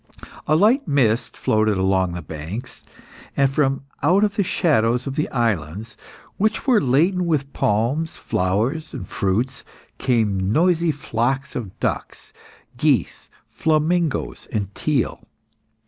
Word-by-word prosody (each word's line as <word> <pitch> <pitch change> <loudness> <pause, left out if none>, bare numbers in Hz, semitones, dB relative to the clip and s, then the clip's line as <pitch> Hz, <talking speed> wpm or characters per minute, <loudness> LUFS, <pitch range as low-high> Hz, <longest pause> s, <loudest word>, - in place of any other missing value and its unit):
A 155 - +4
light 220 - +3
mist 125 -6 +1
floated 110 -2 +1
along 95 -1 +1
the 90 -1 -5
banks, 80 - -7 0.5
and 140 - +5
from 135 -1 +1 0.2
out 180 +8 +4
the 200 - -1
shadow 145 - +2
of 125 +2 -3
the 150 - -1
islands, 110 - -2 0.4
which 215 +2 0
were 245 -6 +4
laden 170 +7 +2
with 140 -4 -1
palms, 120 +10 0
flowers, 115 - -1
and 90 - -6
fruits, 105 +7 -1 0.4
came 105 -6 +1
noisy 170 +3 +3
flocks 135 0 -2
of 105 -7 -6
ducks, - - -4 0.4
geese, - - 0 0.2
flamingoes, 160 0 0
and 100 -3 -2
teal. 145 -5 -1
130 Hz, 120 wpm, -22 LUFS, 105-160 Hz, 0.5 s, and